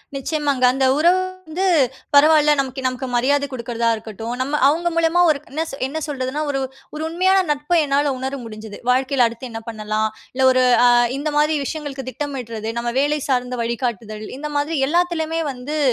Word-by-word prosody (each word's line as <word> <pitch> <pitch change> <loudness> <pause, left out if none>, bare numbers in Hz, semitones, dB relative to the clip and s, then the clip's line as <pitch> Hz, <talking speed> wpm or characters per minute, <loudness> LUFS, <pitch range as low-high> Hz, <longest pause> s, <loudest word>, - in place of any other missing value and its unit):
நிச்சயமாங்க. 285 -1 -1
அந்த 265 0 +1
உறவு 345 +4 +4 0.3
வந்து 375 +4 0 0.5
பரவால்ல. 300 +1 +6
நமக்கு 265 0 -2
நமக்கு 255 +1 -4
மரியாத 285 +4 +2
குடுக்குறதா 235 -2 -2
இருக்கட்டும். 225 +1 -6
நம்ம 285 +3 -1
அவுங்க 335 +4 +1
மூலமா 335 +1 +3
ஒரு 300 -2 +2
என்ன 310 +4 -1 0.2
என்ன 300 - -5
சொல்றதுன்னா, 270 0 -3
ஒரு 270 - -1 0.4
ஒரு 310 - -4
உண்மையான 375 +4 +3
நட்ப 295 +4 0
என்னால 285 0 +1
உணர 265 +2 -3
முடிஞ்சிச்சு. 215 -1 -9
வாழ்க்கையில 260 0 +2
அடுத்து 230 +2 -8
என்ன 225 0 -6
பண்ணலாம்? 215 0 -1 0.2
இல்ல 260 +1 +2
ஒரு 255 0 +3 0.2
அ - - +7 0.3
இந்த 295 +2 -2
மாத்ரி 305 +1 +3
விஷயங்களுக்கு 280 -4 -5
திட்டமிடறது. 245 -6 -5
நம்ம 240 0 -2
வேலை 295 +2 +1
சார்ந்த 250 -1 0
வழிகாட்டுதல். 230 -3 -3
இந்த 300 +1 -5
மாதிரி 295 +3 -1
எல்லாத்துலயுமே 330 -1 0
வந்து 265 +4 -5
275 Hz, 160 wpm, -20 LUFS, 245-300 Hz, 0.5 s, அ